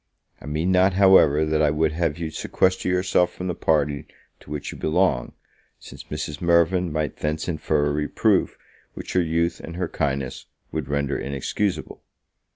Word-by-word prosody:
I -, -, -10 dB
mean 80 Hz, +5 st, 0 dB
not, 95 Hz, +1 st, +4 dB
however, 90 Hz, -6 st, +5 dB
that 80 Hz, 0 st, +1 dB
I 75 Hz, -, +4 dB
would 75 Hz, +1 st, +1 dB
have 80 Hz, -1 st, -1 dB
you 80 Hz, -2 st, -4 dB
sequester 95 Hz, +3 st, 0 dB
yourself 90 Hz, -1 st, +2 dB
from 90 Hz, -, -6 dB
the 90 Hz, -, -1 dB
party 75 Hz, -3 st, 0 dB, 0.3 s
to -, -, -17 dB
which 75 Hz, -1 st, -5 dB
you -, -, -9 dB
belong, 80 Hz, -6 st, +1 dB, 0.4 s
since -, -, -12 dB
Mrs. 75 Hz, 0 st, -5 dB
Mirvan 85 Hz, +1 st, +2 dB
might 75 Hz, -2 st, -2 dB
thence 75 Hz, +1 st, -2 dB
infer 80 Hz, -3 st, 0 dB
a 75 Hz, -, +1 dB
reproof 75 Hz, 0 st, +1 dB, 0.4 s
which -, -, -7 dB
your 90 Hz, -, +3 dB
youth 85 Hz, +1 st, 0 dB
and 85 Hz, -, -8 dB
her 90 Hz, -1 st, -2 dB
kindness 70 Hz, -5 st, -3 dB, 0.2 s
would 80 Hz, -4 st, -3 dB
render 70 Hz, 0 st, -1 dB
inexcusable. 70 Hz, +8 st, -3 dB
80 Hz, 165 wpm, -23 LUFS, 75-90 Hz, 0.4 s, however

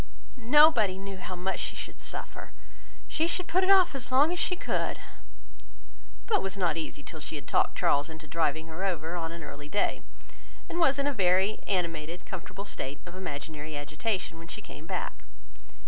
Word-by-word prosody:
"Nobody 240 Hz, -6 st, +6 dB
knew 195 Hz, 0 st, -6 dB
how 185 Hz, 0 st, -5 dB
much 185 Hz, +2 st, -1 dB
she -, -, -2 dB
should -, -, -6 dB
suffer. -, -, -6 dB, 0.5 s
She 320 Hz, +1 st, +1 dB
should 365 Hz, +1 st, +1 dB
put 370 Hz, +2 st, +3 dB
it 375 Hz, -, +2 dB
off 375 Hz, -4 st, +7 dB
as 260 Hz, -2 st, -4 dB
long 285 Hz, +5 st, +6 dB
as 360 Hz, -, -2 dB
she 360 Hz, -, +2 dB
could;" 360 Hz, -, -1 dB, 1.3 s
but 450 Hz, -, +3 dB
was 195 Hz, +1 st, -3 dB
not 175 Hz, -5 st, +2 dB
easy 155 Hz, -3 st, -4 dB
till 160 Hz, -, -8 dB
she 155 Hz, -, -4 dB
had 145 Hz, -2 st, -6 dB
talked -, -, +2 dB
Charles 145 Hz, +1 st, +3 dB
into 160 Hz, -1 st, -10 dB
driving 160 Hz, 0 st, 0 dB
her 165 Hz, +3 st, -5 dB
over 170 Hz, -3 st, -1 dB
on 165 Hz, -2 st, -2 dB
an 170 Hz, -1 st, -7 dB
early 145 Hz, 0 st, -8 dB
day, 205 Hz, -, +1 dB, 0.7 s
and 340 Hz, -, -3 dB
was 280 Hz, -5 st, +5 dB
in 280 Hz, -, +1 dB
a 285 Hz, -, +2 dB
very 190 Hz, 0 st, +3 dB
animated, 170 Hz, -3 st, -1 dB
comfortable 195 Hz, +2 st, -6 dB
state 140 Hz, -7 st, -4 dB
of 175 Hz, -, -9 dB
imaginary 155 Hz, -3 st, -5 dB
agitation, 165 Hz, +4 st, -2 dB
when 165 Hz, -, -10 dB
she 200 Hz, -, -5 dB
came 155 Hz, -, -10 dB
back. -, -, -4 dB
185 Hz, 185 wpm, -29 LUFS, 160-240 Hz, 1.3 s, off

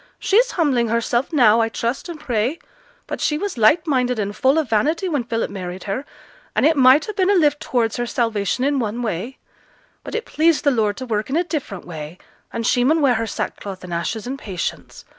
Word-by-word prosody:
'She's 475 Hz, +5 st, +3 dB
humbling 270 Hz, -9 st, +2 dB
herself 235 Hz, +2 st, 0 dB
now, 235 Hz, -7 st, +5 dB
I 225 Hz, -, +1 dB
trust 235 Hz, +8 st, -3 dB
and 330 Hz, -3 st, -7 dB
pray, 250 Hz, 0 st, -1 dB, 0.5 s
but -, -, -5 dB
she 300 Hz, -, +1 dB
was 405 Hz, +4 st, -3 dB
light 250 Hz, +9 st, +4 dB
minded 250 Hz, -5 st, +1 dB
and 205 Hz, -1 st, -2 dB
full 265 Hz, +4 st, +3 dB
of 315 Hz, -4 st, +1 dB
vanity 300 Hz, -, +1 dB
when 290 Hz, -8 st, -1 dB
Philip 230 Hz, -2 st, -2 dB
married 185 Hz, -2 st, -6 dB
her, 230 Hz, +8 st, -3 dB, 0.5 s
and -, -, +3 dB
it 320 Hz, +1 st, +4 dB
might 265 Hz, +2 st, +6 dB
ha' 425 Hz, -, -6 dB
been 375 Hz, 0 st, +2 dB
a 405 Hz, -, +4 dB
lift 295 Hz, -4 st, +3 dB
towards 230 Hz, -3 st, -1 dB
her 240 Hz, 0 st, -2 dB
salvation 230 Hz, -1 st, -1 dB
in 280 Hz, 0 st, +1 dB
one 230 Hz, +1 st, -2 dB
way; 220 Hz, +4 st, -3 dB, 0.7 s
but -, -, -6 dB
it 460 Hz, +1 st, -2 dB
pleased 320 Hz, 0 st, +2 dB
the 285 Hz, -, +4 dB
Lord 215 Hz, -5 st, 0 dB
to 255 Hz, -, -5 dB
work 215 Hz, -2 st, -2 dB
in 275 Hz, -, -1 dB
a 345 Hz, -, +2 dB
different 280 Hz, -, -5 dB
way, 160 Hz, 0 st, -8 dB, 0.3 s
and 230 Hz, 0 st, -3 dB
she 245 Hz, -, +3 dB
mun 310 Hz, +6 st, +3 dB
wear 275 Hz, -4 st, +4 dB
her 225 Hz, -1 st, -1 dB
sackcloth 195 Hz, -2 st, -5 dB
and 180 Hz, -1 st, -7 dB
ashes 185 Hz, +7 st, -3 dB
in 265 Hz, +3 st, -4 dB
patience. 190 Hz, -9 st, -5 dB
245 Hz, 215 wpm, -21 LUFS, 215-295 Hz, 0.7 s, might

